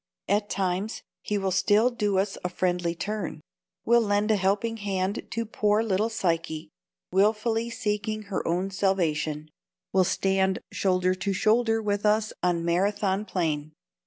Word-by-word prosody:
At 205 Hz, +1 st, +1 dB
times 190 Hz, +3 st, -2 dB, 0.2 s
he 210 Hz, -, -1 dB
will 195 Hz, -1 st, -1 dB
still 205 Hz, +6 st, +3 dB
do 210 Hz, -5 st, 0 dB
us 195 Hz, +1 st, 0 dB
a 180 Hz, -, -1 dB
friendly 175 Hz, -2 st, -1 dB
turn: 205 Hz, -1 st, -4 dB, 0.5 s
will 235 Hz, +1 st, +5 dB
lend 205 Hz, 0 st, +1 dB
a -, -, +4 dB
helping 205 Hz, +4 st, 0 dB
hand 195 Hz, -1 st, -2 dB
to 230 Hz, 0 st, -2 dB
poor 210 Hz, 0 st, +1 dB
little 215 Hz, +1 st, +1 dB
Psyche, 165 Hz, -7 st, -2 dB, 0.4 s
wilfully 220 Hz, +4 st, +2 dB
seeking 215 Hz, -1 st, -2 dB
her 200 Hz, -2 st, -3 dB
own 180 Hz, +3 st, 0 dB
salvation; 155 Hz, -6 st, 0 dB, 0.4 s
will 190 Hz, -1 st, +5 dB
stand 190 Hz, +1 st, +1 dB
shoulder 185 Hz, -1 st, +1 dB
to 190 Hz, +2 st, -2 dB
shoulder 225 Hz, +2 st, +2 dB
with 205 Hz, -1 st, -1 dB
us 215 Hz, 0 st, +2 dB
on 175 Hz, -2 st, +1 dB
Marathon 195 Hz, +3 st, +1 dB
plain. 155 Hz, -6 st, -2 dB
195 Hz, 145 wpm, -26 LUFS, 185-215 Hz, 0.5 s, will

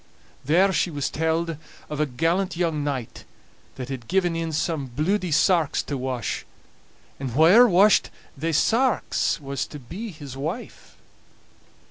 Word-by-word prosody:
There 185 Hz, +8 st, +3 dB
she 185 Hz, -, +1 dB
was 145 Hz, -4 st, -3 dB
telled 160 Hz, +1 st, -1 dB, 0.3 s
of 150 Hz, -, -5 dB
a 150 Hz, -, +2 dB
gallant 165 Hz, +8 st, 0 dB
young 165 Hz, -4 st, 0 dB
knight 135 Hz, -5 st, -4 dB, 0.5 s
that 130 Hz, -1 st, -7 dB
had 125 Hz, -4 st, -6 dB
given 180 Hz, -3 st, +1 dB
in 165 Hz, -1 st, -2 dB
some 155 Hz, -2 st, -1 dB
bluidy 175 Hz, +8 st, -1 dB
sarks 165 Hz, -1 st, +2 dB
to 145 Hz, -, -4 dB
wash, 130 Hz, -4 st, -3 dB, 0.8 s
and 135 Hz, -1 st, -3 dB
whaever 170 Hz, -, +6 dB
washed 195 Hz, +3 st, +5 dB, 0.3 s
thae 160 Hz, +4 st, -2 dB
sarks 230 Hz, -, +1 dB
was 140 Hz, -1 st, -4 dB
to 150 Hz, -, -9 dB
be 180 Hz, -, -7 dB
his 145 Hz, -7 st, -9 dB
wife. 160 Hz, -, -6 dB
160 Hz, 140 wpm, -24 LUFS, 140-180 Hz, 0.8 s, whaever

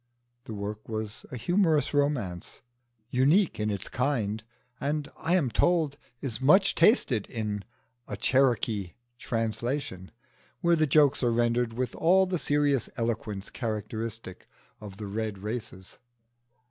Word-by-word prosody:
(The 110 Hz, -, -6 dB
work 105 Hz, +2 st, -6 dB
was 110 Hz, -1 st, -5 dB
a 125 Hz, -, -4 dB
humorous 160 Hz, -, +2 dB
romance, 140 Hz, -, -1 dB, 0.5 s
unique 150 Hz, -, +3 dB
in 105 Hz, 0 st, 0 dB
its 100 Hz, -2 st, -3 dB
kind, 115 Hz, -5 st, -1 dB, 0.4 s
and 145 Hz, +1 st, -1 dB
I 170 Hz, +2 st, 0 dB
am 145 Hz, -10 st, +1 dB
told 155 Hz, +2 st, +2 dB, 0.2 s
is 130 Hz, -3 st, -4 dB
much 190 Hz, +9 st, +5 dB
tasted 130 Hz, -, +3 dB
in 105 Hz, -3 st, -3 dB, 0.4 s
a 105 Hz, -, -5 dB
Cherokee 115 Hz, -6 st, +1 dB, 0.3 s
translation, 115 Hz, -3 st, -3 dB, 0.5 s
where 170 Hz, -1 st, +4 dB
the 155 Hz, -1 st, +2 dB
jokes 145 Hz, -1 st, +4 dB
are 120 Hz, -2 st, +2 dB
rendered 120 Hz, 0 st, +1 dB
with 125 Hz, +1 st, -2 dB
all 190 Hz, +3 st, +4 dB
the 180 Hz, -2 st, -2 dB
serious 145 Hz, -3 st, +1 dB
eloquence 110 Hz, -4 st, -3 dB
characteristic 110 Hz, -2 st, -5 dB, 0.3 s
of 100 Hz, -2 st, -10 dB
the 105 Hz, -, -6 dB
Red 105 Hz, 0 st, -3 dB
races.) 100 Hz, -2 st, -6 dB
120 Hz, 130 wpm, -28 LUFS, 105-145 Hz, 0.5 s, much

